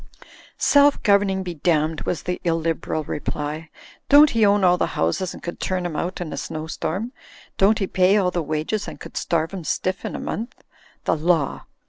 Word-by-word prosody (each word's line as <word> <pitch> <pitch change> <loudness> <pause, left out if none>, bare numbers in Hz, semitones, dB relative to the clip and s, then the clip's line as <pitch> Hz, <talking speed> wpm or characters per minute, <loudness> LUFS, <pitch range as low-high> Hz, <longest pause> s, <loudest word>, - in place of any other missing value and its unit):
"Self 285 0 +4
governing 200 -2 +3
be 180 -1 -5
damned," 160 0 0
was 170 - -2
the 180 0 -3
illiberal 165 -2 -1
re 145 - -4
ply. 150 +2 -4 0.4
"Don't 290 +1 +8
he 225 -1 +2
own 205 -1 +4
all 180 -1 +5
the - - +2
houses 85 - 0
and - - -12
could 175 - -6
turn 185 -1 -2
'em 170 -3 -3
out 175 +4 -3
in 175 -3 -5
a - - -5
snow 155 0 -5
storm? 180 +8 -3 0.5
Don't 205 +3 +4
'e 195 - +1
pay 185 +2 +3
all 185 -3 +2
the 175 - -1
wages 155 +7 -2
and - - -8
could - - -11
starve 165 0 -1
'em 185 -3 -5
stiff 185 +4 -2
in - - -4
a - - -4
month? 230 +4 -5 0.4
The - - +1
Law!" 160 -3 0
180 Hz, 200 wpm, -22 LUFS, 160-195 Hz, 0.5 s, Don't